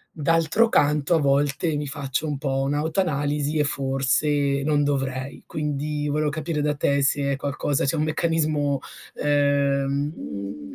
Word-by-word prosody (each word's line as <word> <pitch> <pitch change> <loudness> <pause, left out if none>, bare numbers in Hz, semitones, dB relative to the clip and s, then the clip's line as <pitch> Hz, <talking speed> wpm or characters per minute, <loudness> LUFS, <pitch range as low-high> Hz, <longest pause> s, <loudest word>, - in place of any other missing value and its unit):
d'altro 165 +8 +2
canto 150 -1 +2
a 160 - +3
volte 145 +3 +1
mi 145 - -3
faccio 140 +1 -2
un 145 -2 -3
po' 135 -1 -1
un'autoanalisi 150 0 -1
e 150 - +4
forse 140 0 +2
non 145 -1 +2
dovrei. 135 -1 -2
Quindi 150 0 -3
volevo 150 +1 0
capire 155 +1 -3
da 150 0 0
te 140 0 +1
se 140 0 +2
è - - -1
qualcosa 140 0 -1
se 140 - +1
è 160 - -1
un 155 - +1
meccanismo, 155 -3 0 0.3
ehm, 140 0 +1
uhm, 85 -8 -7
145 Hz, 150 wpm, -23 LUFS, 140-150 Hz, 0.3 s, e